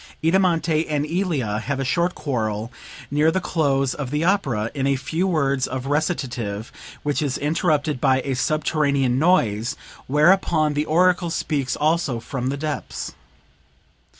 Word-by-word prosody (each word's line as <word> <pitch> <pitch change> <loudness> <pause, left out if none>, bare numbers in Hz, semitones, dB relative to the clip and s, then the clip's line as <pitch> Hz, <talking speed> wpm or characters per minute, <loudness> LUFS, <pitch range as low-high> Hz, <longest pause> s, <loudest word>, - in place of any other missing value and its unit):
"Idamante 165 -2 +2
and 150 -1 0
Ilia 155 - -1
have 135 +4 -3
a 135 - -1
short 170 +7 +1
quarrel 110 -5 -2 0.4
(near 150 +2 +3
the 180 +3 +1
close 140 -7 +1
of 140 -4 -5
the 150 +3 -1
opera) 135 - +1
in 135 -2 -1
a 140 - +2
few 160 +7 -1
words 140 -6 +1
of 130 0 -4
recitative 125 -8 -2 0.3
which 145 0 0
is 140 -4 -1
interrupted 150 -2 0
by 130 0 +3
a 135 +1 -2
subterranean 140 -2 +1
noise, 120 - +2 0.3
whereupon 155 +1 +3
the 150 +1 0
oracle 175 +2 +3
speaks 145 -5 -1
also 155 -5 +1
from 125 +2 -4
the 140 - -2
depths. 150 0 -4
145 Hz, 145 wpm, -22 LUFS, 130-160 Hz, 0.4 s, near